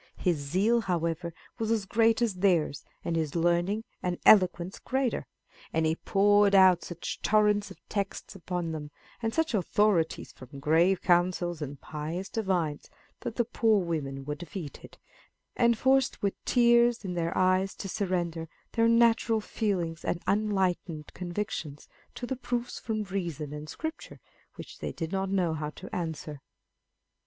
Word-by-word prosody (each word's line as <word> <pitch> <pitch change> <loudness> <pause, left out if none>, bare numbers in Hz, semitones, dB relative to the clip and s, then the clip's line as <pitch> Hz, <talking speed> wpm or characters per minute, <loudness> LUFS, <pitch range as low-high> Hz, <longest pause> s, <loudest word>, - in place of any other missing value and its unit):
His 175 -3 +1
zeal, 190 +12 +1
however, 170 -3 -1 0.3
was 220 -1 -1
as 220 -3 +1
great 225 +3 +3
as 225 -4 +1
theirs, 170 -7 +2 0.2
and 170 - -1
his 160 -2 -1
learning 175 +5 +1 0.2
and 180 -1 -1
eloquence 185 -2 +5
greater; 265 -2 -1 0.4
and 160 0 +1
he 160 0 +2
poured 205 +2 +4
out 185 -2 +6
such 175 -1 -6
torrents 210 -1 +3
of - - -11
texts 200 -2 -3
upon 175 -2 -3
them, 150 -2 -5 0.3
and 225 -1 0
such 320 +3 0
authorities 195 -3 +1
from 130 +2 -12
grave 170 +6 +3
councils 175 -2 +2
and 145 -1 -5
pious 160 +5 -5
divines, 180 -9 -1 0.3
that 225 - -5
the 240 - +1
poor 225 -2 +2
women 140 -6 -3
were 150 - -2
defeated, 155 -1 -8 0.6
and 235 -2 +3
forced 265 0 +2
with 200 - +1
tears 240 -2 +4
in 180 - -3
their 170 -1 -2
eyes 185 +1 +2
to 195 - -6
surrender 175 -4 -2 0.2
their 230 -1 +3
natural 230 -1 +4
feelings 185 -7 -2
and 175 - -2
unenlightened 190 -6 0
convictions 175 -5 -5 0.3
to 245 - -5
the 265 - -3
proofs 245 -1 -3
from 215 -1 -2
reason 170 -7 -4
and 150 +1 -7
Scripture 315 0 -6 0.4
which - - -10
they - - -3
did 165 -1 -5
not 195 0 -1
know 185 -4 +1
how 150 -1 -3
to 185 +4 -9
answer. 160 -4 -4
185 Hz, 150 wpm, -29 LUFS, 165-215 Hz, 0.6 s, out